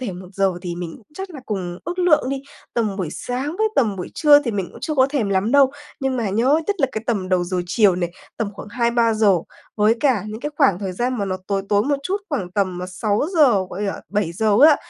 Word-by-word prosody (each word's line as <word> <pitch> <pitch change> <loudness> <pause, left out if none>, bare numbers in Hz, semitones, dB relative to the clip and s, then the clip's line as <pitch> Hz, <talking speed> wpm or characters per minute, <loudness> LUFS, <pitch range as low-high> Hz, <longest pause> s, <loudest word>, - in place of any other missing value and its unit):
thể 235 -7 -3
1 180 0 -9
giờ 195 -1 +2
thì 175 -1 -4
mình 175 -1 -6
cũng 215 - -21
chắc 385 +1 -6
là 290 -5 -9
cùng 180 -4 -4
ước 350 +2 -4
lượng 335 -7 +3
đi, 275 -1 -3 0.3
tầm 215 -5 0
buổi 185 -5 -2
sáng 260 - -4
với 440 0 +3
tầm 215 -7 +2
buổi 180 - -5
trưa 295 -1 +6
thì 245 - -2
mình 195 -4 -2
cũng - - -13
chưa 310 - -2
có 260 -2 +5
thèm 255 -9 0
lắm 195 +3 +1
đâu. 275 -2 +6 0.3
Nhưng 265 -1 0
mà 225 -5 -1
nhớ 255 +9 +3
nhất 410 - 0
là 270 - +4
cái 220 - -4
tầm 200 -6 -1
đầu 180 -1 +2
giờ 180 0 -2
chiều 190 0 +3
này, 175 -1 -1 0.3
tầm 220 - -1
khoảng - - -9
2:00-3:00 230 -4 +2 0.4
với 215 +1 +4
cả 250 -9 +2
những 215 +2 -6
cái 295 - -3
khoảng 260 - +4
thời 195 -2 -4
gian 245 +5 -1
mà 200 - 0
nó 185 -1 -2
tối 195 -1 -1
tối 205 0 +3
một 285 +4 +1
chút, 375 +7 -1
khoảng 220 - -3
tầm 185 -3 0
6:00, 220 - +2
gọi 195 - -5
là, 200 -1 -2
7:00 205 +1 +1
á. 295 - +6
215 Hz, 245 wpm, -21 LUFS, 190-270 Hz, 0.4 s, trưa